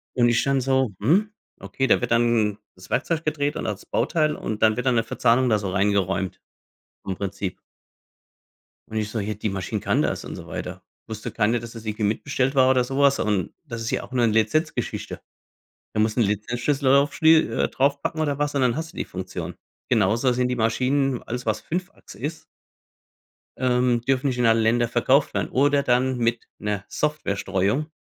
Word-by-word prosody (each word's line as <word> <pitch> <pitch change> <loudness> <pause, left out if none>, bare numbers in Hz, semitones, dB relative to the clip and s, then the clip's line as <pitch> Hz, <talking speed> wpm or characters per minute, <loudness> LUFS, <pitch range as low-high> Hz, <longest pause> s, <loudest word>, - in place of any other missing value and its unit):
Und 120 -1 +4
ich 120 - +2
dann 135 -1 +2
so: 130 -2 +1
„Hm, 190 - +2 0.3
okay.“ 135 - -2
Da - - +4
wird 120 -1 -2
dann 115 -3 +2 0.2
das 90 0 -15
Werkzeug 155 +4 0
gedreht 145 -1 -1
und - - -4
das 105 -2 -4
Bauteil. 155 -2 +1
Und 110 -1 -5
dann 110 -1 +5
wird 125 - -3
dann 125 -2 +3
'ne 115 - +2
Verzahnung 125 +2 +2
da 105 -2 +3
so 100 -2 -3
reingeräumt, 95 -2 0 0.6
im 95 - -3
Prinzip. 100 -1 -4 1.3
Und 110 - -5
ich 105 -1 -1
so: 110 - -3
„Ja, 105 +2 -2
die 105 0 -3
Maschine 95 -2 -3
kann - - +1
das - - -2
und - - -6
so - - -10
weiter.“ - - -6 0.2
Wusste 110 -1 -6
keiner, 115 +2 +1
dass 115 0 -9
das 115 -1 -10
irgendwie 110 0 -3
mitbestellt 130 +5 0
war 130 -1 +5
oder 130 -1 +4
sowas. 140 +2 +2
Und 100 -5 0
das 115 0 -6
ist 115 - -3
ja - - -1
auch - - -12
'ne 120 -2 +2
Lizenzgeschichte. 110 +9 -1 0.7
Da 105 - 0
musst 110 0 +1
du 120 - +2
'n - - +4
Lizenzschlüssel 120 +7 -1
drauf 140 +1 +4
schlie 160 0 +5
äh, - - +1
draufpacken 140 +3 0
oder 145 -2 0
was 145 0 -1
und 140 - +1
dann 125 0 +2
hast 160 0 -5
du - - -18
die - - -2
Funktion. - - -6 0.3
Genauso 115 +3 +2
sind 125 0 0
die 125 - -1
Maschinen 130 +3 +1
alles 125 +2 -5
was 110 0 0
5 180 +3 -4
Achse 100 - -15
ist 150 +5 -5 1.1
ähm, 125 -1 +2
dürfen 135 +2 +1
nicht 125 -2 -1
in 120 - +2
alle 115 0 +4
Ländern 115 +1 +2
verkauft 130 +4 +2
werden, - - -1
oder 145 +1 +3
dann 125 0 +2
mit 115 0 0 0.2
'ner 105 -1 -3
Software 150 -9 -1
Streuung, 100 +10 0
120 Hz, 200 wpm, -24 LUFS, 110-135 Hz, 1.3 s, dann